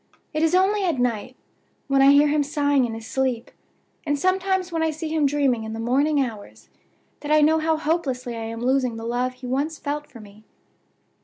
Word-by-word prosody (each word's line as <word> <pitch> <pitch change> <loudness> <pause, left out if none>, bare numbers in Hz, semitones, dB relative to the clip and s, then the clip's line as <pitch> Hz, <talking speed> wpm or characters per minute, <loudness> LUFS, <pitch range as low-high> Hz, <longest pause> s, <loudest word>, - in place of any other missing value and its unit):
It 310 - -1
is 325 +2 +3
only 395 +2 +2
at 340 -7 0
night, 240 -4 -2 0.5
when 275 -1 +3
I 270 - +7
hear 290 +1 +5
him 295 0 +2
sighing 285 -2 +1
in 225 -2 -5
his 225 0 -9
sleep, 255 -2 -2 0.5
and 290 -2 -1
sometimes 375 +2 0
when 330 -1 -1
I 320 - +2
see 315 +1 -5
him 310 -2 +2
dreaming 275 -5 +1
in 220 0 -6
the 225 - -6
morning 280 +6 +1
hours, 225 -6 -5 0.5
that 295 - -5
I 305 0 +5
know 315 +2 +4
how 315 0 +1
hopelessly 280 -7 -2
I 225 -1 -5
am 230 +1 -6
losing 255 -2 +1
the 225 - -7
love 245 +2 -1
he 255 0 -12
once 280 +5 -2
felt 295 +1 -4
for 235 - -14
me. 210 0 -15
280 Hz, 210 wpm, -23 LUFS, 245-310 Hz, 0.5 s, I